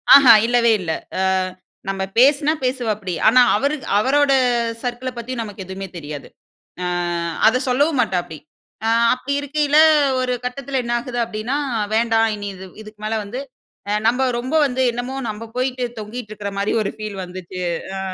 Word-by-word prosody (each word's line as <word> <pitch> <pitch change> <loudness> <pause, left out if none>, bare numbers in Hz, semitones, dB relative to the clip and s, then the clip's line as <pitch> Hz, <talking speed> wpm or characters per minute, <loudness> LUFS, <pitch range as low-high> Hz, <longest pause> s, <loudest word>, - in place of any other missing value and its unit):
ஆஹா, 270 -4 +9
இல்லவே 235 -1 +3
இல்ல. 165 -2 -3 0.3
அ - - +1 0.7
நம்ம 195 0 -2
பேசினா 285 +4 +5
பேசுவாப்டி, 220 -7 -2
ஆனா 250 +3 +7
அவரு 280 +7 +1 0.2
அவரோட 275 +6 +3 0.5
சர்க்கிள 245 +1 -3
பத்தியும் 235 0 -4
நமக்கு 205 -2 -8
எதுமே 190 +1 -6
தெரியாது, 145 -3 -7 0.6
அ - - -1 0.6
அத 255 +4 +3
சொல்லவும் 285 +2 +2
மாட்டாப்டி. 175 -4 -2 0.5
அ - - +2 0.2
அப்டி 265 +2 -4
இருக்கையில, 295 +1 +1 0.4
ஒரு 250 0 0
கட்டத்தில 265 +1 -3
என்ன 240 0 -2
ஆகுது 245 0 -5
அப்டின்னா, 230 +5 -3 0.4
வேண்டாம் 225 0 +3
இனி 205 -1 -5
இது, 190 0 -10 0.2
இதுக்கு 215 0 -14
மேல 220 +1 -1
வந்து 245 +7 -5 0.7
நம்ம 250 +3 +2
ரொம்ப 260 +6 -3
வந்து 260 -1 -1
என்னமோ, 245 +2 -5 0.2
நம்ப 215 +1 -6
போயிட்டு 255 0 -1 0.2
தொங்கிட்ருக்கிற 215 -2 -6
மாரி 200 +1 0
ஒரு 200 - -1
ஃபீல் 215 -2 -6
வந்துச்சு. 180 0 -8 0.4
அ. - - -3
235 Hz, 150 wpm, -20 LUFS, 205-260 Hz, 0.7 s, ஆஹா